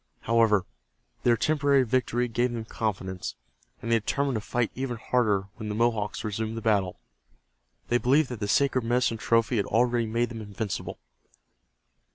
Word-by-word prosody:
However, 110 -4 +3 0.6
their 120 -1 +3
temporary 145 -2 +3
victory 125 0 0
gave 120 +1 0
them 115 -2 -4
confidence, 95 -5 -3 0.5
and 115 - -2
they 115 - +4
determined 140 +5 -1
to 110 - -1
fight 120 +1 -1
even 130 -2 -3
harder 110 -4 +1 0.2
when 110 -1 -5
the 105 - -3
Mohawks 110 -2 0
resumed 110 +1 -3
the - - -4
battle. 100 -5 +1 0.9
They 120 - +3
believed 135 +4 +3
that 125 -3 -6
the 105 - -2
sacred 130 +3 +2
medicine 120 0 +1
trophy 115 +2 +2
had 100 - 0
already 120 0 +2
made 115 +2 0
them 115 -2 -7
invincible. 105 0 -5
115 Hz, 160 wpm, -27 LUFS, 110-125 Hz, 0.9 s, they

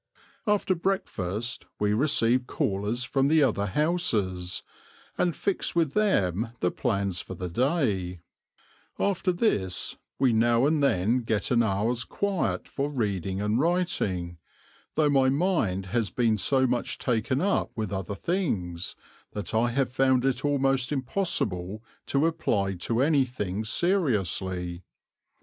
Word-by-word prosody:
After 205 -2 +2
breakfast 120 - -2
we 105 0 +2
receive 125 -1 +2
callers 105 +5 -1
from 135 +2 +1
the 155 0 +4
other 100 -6 +1
houses, 105 - 0 0.5
and 175 -2 +1
fix 200 -3 -1
with 165 -5 +2
them 115 - +1
the 90 - +1
plans 100 -7 -1
for 95 - -8
the 90 +1 -4
day; 100 - 0 0.8
after 195 -1 +1
this, 105 - 0 0.2
we 130 -3 +3
now 115 +2 +3
and 150 0 +2
then 115 -2 +2
get 110 -4 -1
an 120 -1 +4
hour's 115 +3 0
quiet 200 +4 -1
for 140 +1 -2
reading 100 - -2
and 105 +3 +1
writing, 105 - 0 0.6
though 155 -1 +3
my 135 -2 +4
mind 135 - +1
has 115 -5 +1
been 115 +4 +2
so 130 +7 +2
much 125 -1 -1
taken 125 +1 0
up 200 +5 +1
with 110 -3 -3
other 95 +1 -3
things, 95 - -2 0.4
that 105 +1 -4
I 115 +2 +3
have 130 +1 0
found 130 -1 +3
it 135 -2 0
almost 135 -2 +1
impossible 110 - -1 0.2
to 140 +3 +2
apply 110 -12 0
to 115 +2 +2
anything 125 - 0
seriously. 95 - 0
120 Hz, 130 wpm, -27 LUFS, 100-145 Hz, 0.8 s, the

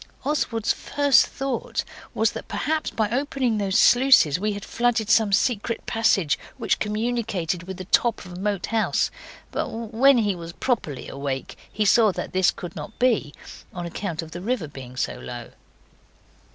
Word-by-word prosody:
Oswald's 245 -6 0
first 285 -1 +3
thoughts 275 - -3 0.3
was - - +2
that - - -8
perhaps 315 0 -1
by 220 -2 0
opening 255 -3 0
those 195 -2 +1
sluices 245 - +6
we 210 +1 0
had 200 0 -7
flooded 230 -3 0
some 220 -1 +4
secret 225 +2 0
passage 210 -9 +2 0.2
which - - 0
communicated 210 -6 -1
with 190 -1 -6
the 185 - -7
top 225 +2 +1
of 180 0 -9
Moat 200 -1 -1
House, 225 -1 +1 0.4
but - - -2
when 230 +4 +3
he 210 -4 +2
was 170 -1 -8
properly 190 - -2
awake 135 -1 -4 0.2
he 215 - 0
saw 215 0 +5
that - - -5
this 185 0 +4
could 175 -2 -6
not - - -8
be, 230 - +2 0.4
on 175 -1 -4
account 170 -1 -4
of 160 - -11
the 175 - -7
river 225 -5 -1
being 130 -3 -10
so - - -2
low. 120 -1 -8
210 Hz, 165 wpm, -24 LUFS, 175-240 Hz, 0.4 s, sluices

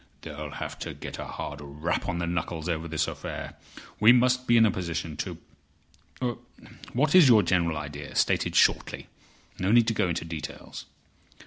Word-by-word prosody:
"They'll 75 -1 -6
have - - -6
to - - -6
get - - -8
a - - -4
hard 75 - -6
rap 75 +4 -3
on 90 - -2
the 85 - -1
knuckles 85 -1 -3
over 85 -1 -2
this 80 -1 -1
affair. - - -6 0.5
We 110 +2 +8
must 125 +1 +3
be 120 - +5
in 115 - +7
a 105 - +3
position 85 -3 -4 1.0
to—What 125 +3 -4
is 180 -6 +8
your 110 -5 +6
general 85 -3 +1
idea, 75 -1 -7
stated - - +1
shortly? - - +2 0.5
No 95 +2 +1
need 115 -1 +5
to - - 0
go 105 -4 +1
into 85 - -2
details." 80 -2 -7
85 Hz, 165 wpm, -27 LUFS, 80-115 Hz, 1.0 s, We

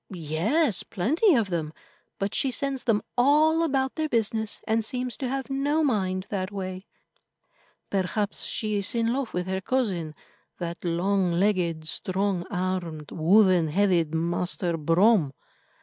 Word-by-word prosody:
Yes, 190 - 0
plenty 305 - +2
of 215 -6 +1
them, 160 -3 -2 0.4
but 195 +1 -2
she 270 - +2
sends 270 0 -2
them 225 -4 +2
all 300 +6 +4
about 270 -5 0
their 315 -1 -2
business, 220 -2 0
and 225 +1 +1
seems 250 +2 -2
to 260 - -3
have 270 +1 -3
no 290 +4 +1
mind 190 -8 0
that 190 -1 -2
way." 185 -1 -6 1.0
"Perhaps 200 +2 -1
she 215 -2 -2
is 200 +3 0
in 230 0 +1
love 265 -3 -2
with 180 0 -2
her 190 0 -2
cousin, 190 -11 -1 0.4
that 170 -1 -5
long 180 +1 +1
legged, 170 -4 0
strong 185 +1 -1
armed, 180 -5 -3
wooden 180 0 +4
headed 170 -2 +1
Master 175 +1 -1
Brome." 165 0 +3
195 Hz, 140 wpm, -26 LUFS, 175-245 Hz, 1.0 s, all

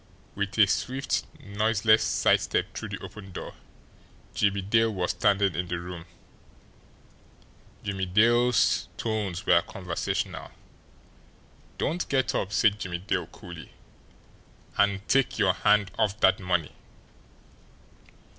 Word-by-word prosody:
With 100 0 -3
a 105 - +8
swift, 130 +6 -1
noiseless 110 -1 +2
side - - +3
step - - -1
through - - -6
the - - -5
open 100 -3 -10
door, - - -7 0.8
Jimmie 100 -1 +1
Dale 115 +3 +2
was 90 -3 -1
standing 100 -2 +2
in 90 +2 -3
the 85 0 -2
room. 85 -1 -8 1.8
Jimmie 95 -2 -3
Dale's 120 +5 +3
tones 105 -5 -3
were 85 - +5
conversational. 90 -2 -4 1.3
"Don't 175 +4 -2
get 130 -2 +1
up," 100 - -2
said 105 -1 +3
Jimmie 90 -3 -3
Dale 90 - -2
coolly. 85 -2 -11 1.0
"And 100 0 +1
take 135 -1 +2
your - - +3
hand 105 -2 +2
off 105 -1 +1
that - - +5
money!" 90 -5 -1
100 Hz, 115 wpm, -27 LUFS, 90-110 Hz, 1.8 s, a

